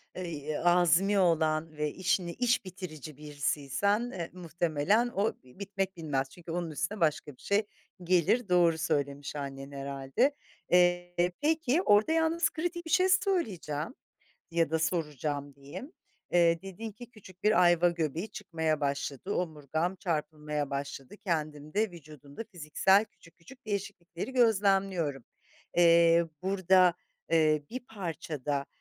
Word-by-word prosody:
eee, 185 - -4
y 150 -1 -4
azmi 180 +3 +4
olan 160 -3 +1
ve 150 -1 -1
işini 180 -1 0
iş 245 -4 +1
bitirici 155 -6 -8
birisiysen, 150 - -1
eee, 170 -3 -5
muhtemelen 175 +6 +1
o 205 +3 +1
bitmek 195 +7 -4
bilmez. 140 -5 -2
Çünkü 170 +2 -10
onun 170 -2 -2
üstüne 175 +7 -3
başka 150 -3 0
bir - - -23
şey 205 +1 +1 0.4
gelir. 185 +5 +2
Doğru 170 -2 +4
söylemiş 145 -3 -2
annen 135 -1 -6
herhâlde. 140 - -1 0.3
Eee, 175 0 +3
peki. 315 0 +2
Orada 210 - +4
yalnız 325 0 +2
kritik 345 +1 -4
bir 325 - -6
şey 370 0 +4
söyleyeceğim 230 - 0 0.6
ya 165 -2 +1
da 160 - +1
soracağım 150 -3 -2
diyeyim. 140 - -9 0.4
"Dedin 175 +5 +1
ki 240 +3 -12
küçük 190 -4 -16
bir 210 -3 +5
ayva 175 0 +5
göbeği 165 +3 -2
çıkmaya 160 -6 -2
başladı, 140 +5 -2
omurgam 160 +1 -2
çarpılmaya 150 -4 -3
başladı, 140 +4 -5
kendimde 160 +2 -2
vücudumda 150 - -10
fiziksel 185 +5 +3
küçük 165 -5 -21
küçük 240 +8 -16
değişiklikleri 200 +1 -4
gözlemliyorum." 195 - +2 0.5
Eee, 170 0 +6 0.2
burada, 185 -2 +4 0.4
eee, 155 -2 +3
bir 255 +2 -4
parça 165 - -6
da, 140 -1 -1
170 Hz, 125 wpm, -30 LUFS, 150-200 Hz, 0.6 s, Eee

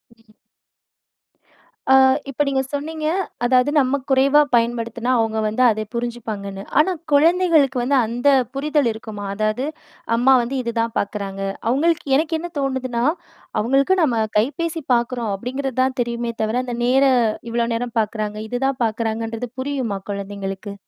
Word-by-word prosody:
ம். 225 - -28 1.7
அ - - +8 0.3
இப்ப 285 +2 0
நீங்க 270 -1 +1
சொன்னீங்க, 310 +2 -3 0.4
அதாவது 255 +3 +3
நம்ம 265 +1 +2
குறைவா 275 +3 +5
பயன்படுத்தினா, 235 +1 0
அவங்க 220 -1 0
வந்து 220 +4 +1
அதை 215 0 -1
புரிஞ்சுப்பாங்கன்னு. 215 -5 -4 0.2
ஆனா, 370 +5 +4 0.2
குழந்தைகளுக்கு 315 -3 +4
வந்து 275 +3 +2
அந்த 245 +5 +1 0.3
புரிதல் 295 -2 +1
இருக்குமா? 215 -2 -8
அதாவது, 215 +5 -1 0.5
அம்மா 265 +3 +5
வந்து 250 +3 -3
இதுதான் 230 -1 -2
பாக்குறாங்க. 200 -1 -4 0.3
அவுங்களுக்கு 325 +5 +1
எனக்கு 320 +1 0
என்ன 345 +2 -6
தோணுதுன்னா, 260 -3 -1 0.6
அவங்களுக்கு 275 - +2
நம்ம 235 -7 +2
கைபேசி 320 +7 -1
பாக்குறோம் 235 -2 -1
அப்படீங்கிறது 260 +4 -4
தான் 260 +1 -1
தெரியுமே 235 0 -2
தவிர, 220 +3 0
அந்த 245 - -4
நேர 265 +2 +4 0.5
இவ்வளோ 235 0 0
நேரம் 240 0 -4
பார்க்குறாங்க, 210 0 -4
இதுதான் 260 +1 -1
பார்க்குறாங்கன்றது 225 +1 -3
புரியுமா? 260 -8 -2
குழந்தைங்களுக்கு. 200 0 -5
240 Hz, 130 wpm, -21 LUFS, 220-275 Hz, 1.7 s, அ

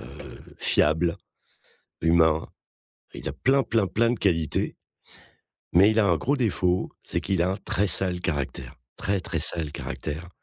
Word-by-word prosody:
heu, - - -11 0.2
fiable, 80 +3 +2 0.8
humain. 80 -1 +3 0.7
Il - - -7
a - - -5
plein, 135 0 +2
plein, 110 -4 +1
plein 115 +3 +2
de 120 - -3
qualités 80 -6 0 1.0
mais, 95 +5 +6
il 110 - +2
a 105 - +4
un 85 - +4
gros 140 - 0
défaut 90 -6 +1
c'est - - -2
qu'il 95 -3 0
a 90 - +2
un 95 - -2
très 100 0 -1
sale 90 0 +1
caractère, 75 -7 -4 0.2
très, 100 0 -1
très, 85 -2 -4
sale 80 -2 -1
caractère, 80 +4 -6
90 Hz, 155 wpm, -25 LUFS, 80-100 Hz, 1.0 s, mais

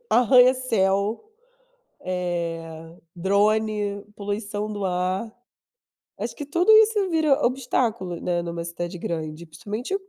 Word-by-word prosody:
arranha-céu, 245 - +3 0.8
eh, 165 -2 -4 0.2
drone, 205 +2 +1
poluição 205 +1 -4
do 205 -2 -3
ar. 185 +4 -1 0.9
Acho - - -4
que 290 - -6
tudo 350 +8 +3
isso 435 -3 +5
vira 315 -3 +2
obstáculo, 235 -8 -1
né, 175 -1 -1
numa 170 0 -5
cidade 175 +1 -5
grande, 160 0 -5
principalmente 210 - -5
200 Hz, 100 wpm, -24 LUFS, 175-240 Hz, 0.9 s, isso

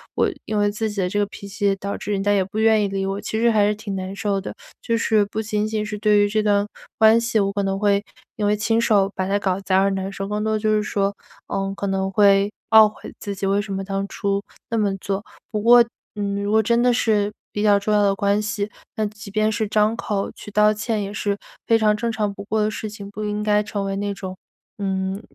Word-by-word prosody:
我 - - +2 0.2
因 215 - -2
为 205 0 +3
自 220 +1 -2
己 205 - -5
的 180 - +1
这 205 - -2
个 205 - +2
脾 200 0 -10
气 205 +1 -4
也 200 -1 +3
导 200 +1 -4
致 210 - -5
人 195 -1 0
家 205 0 +3
也 195 -2 +3
不 205 +3 -5
愿 220 -1 +4
意 - - +1
理 195 0 -2
我， 195 +1 -3
其 220 - -3
实 235 +1 +4
还 210 -2 +4
是 210 - +2
挺 205 -2 -5
难 190 0 -4
受 200 -2 -1
的。 - - -6 0.3
就 230 0 0
是 220 -2 +3
不 215 +2 -3
仅 210 -1 -1
仅 215 -1 -2
是 210 0 -5
对 210 -1 +4
于 205 - +4
这 215 +1 +1
段 205 -1 +2 0.3
关 220 +1 +6
系， 230 -1 +1
我 200 -1 +1
可 200 0 -1
能 195 0 -1
会 205 -1 +2 0.3
因 210 - -1
为 210 +1 +3
亲 225 +2 +1
手 200 -4 +3
把 185 0 -1
它 200 +1 +1
搞 190 -1 0
砸 190 -1 +1
而 195 - +3
难 195 0 -3
受， 195 0 -5
更 210 +1 -2
多 220 - 0
的 215 - 0
就 215 0 +1
是 210 - +2
说， 200 -1 -1 0.3
呃， 195 0 -2
可 200 - -2
能 195 0 0
会 200 0 +4 0.2
懊 220 -1 +9
悔 210 - -11
自 200 -1 -5
己 195 - -3
为 200 +1 +2
什 205 -1 -7
么 195 0 -3
当 195 0 -3
初 200 0 -1 0.3
那 230 - -1
么 200 -3 +1
做。 195 +2 -3 0.3
不 210 -2 -1
过， 240 +1 +7 0.3
嗯， 200 -1 -2
如 205 - -1
果 220 0 +5
真 235 +2 +2
的 250 - +4
是 210 -3 +1 0.2
比 205 - -3
较 205 -1 +5
重 210 +1 -1
要 210 - +4
的 200 -1 +3
关 200 +1 +1
系， 210 0 -2 0.3
那 215 - 0
即 210 0 -8
便 215 +1 +1
是 220 0 -1
张 215 +1 +2
口 205 -3 -2
去 - - -11
道 210 +1 +4
歉， 215 0 -2
也 200 +1 -5
是 205 0 -1 0.3
非 230 - +5
常 215 -1 +3
正 230 +1 -2
常 210 -2 -1
不 200 - -8
过 215 +1 -1
的 210 - +2
事 215 - -5
情。 200 -1 -9
不 215 +1 -6
应 210 0 -2
该 210 0 +3
成 200 -1 -3
为 195 0 -2
那 205 0 -2
种， 185 -1 -6 0.4
嗯， 190 0 -2
205 Hz, 285 characters per minute, -22 LUFS, 200-215 Hz, 0.4 s, 懊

